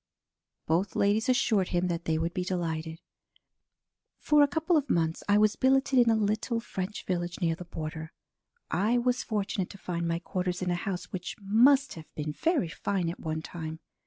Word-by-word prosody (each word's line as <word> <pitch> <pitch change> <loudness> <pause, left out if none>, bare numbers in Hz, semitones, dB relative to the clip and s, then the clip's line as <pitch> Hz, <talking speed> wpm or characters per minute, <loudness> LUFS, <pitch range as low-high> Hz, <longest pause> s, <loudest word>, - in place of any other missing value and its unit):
Both 170 +3 0
ladies 210 +4 +2
assured 220 -7 +3
him 175 0 0
that 170 0 -3
they 160 -1 +1
would 165 +2 -1
be 180 - -1
delighted. 165 -3 -3 1.2
"For 300 -1 +4
a 290 - +6
couple 320 +4 +1
of 290 -2 +1
months 160 -1 +1
I 205 - +5
was 210 0 +4
billeted 265 0 +3
in 240 -1 +5
a 225 - +4
little 220 +2 0
French 200 -3 -5
village 175 -1 -2
near 170 -3 +1
the 175 +2 -8
border. 160 -1 -6 0.6
I 215 +6 +2
was 250 +1 +1
fortunate 200 -4 -2
to 200 - -10
find 170 -3 -3
my 165 0 0
quarters 180 +1 -3
in 180 - 0
a 175 - -2
house 180 -2 -5
which 180 -1 -5
must 250 +8 +4
have 160 -2 -11
been 150 0 -3
very 325 - +1
fine 180 -1 -1
at - - -10
one 160 -1 -3
time. 160 -2 -6
185 Hz, 190 wpm, -29 LUFS, 170-225 Hz, 1.2 s, a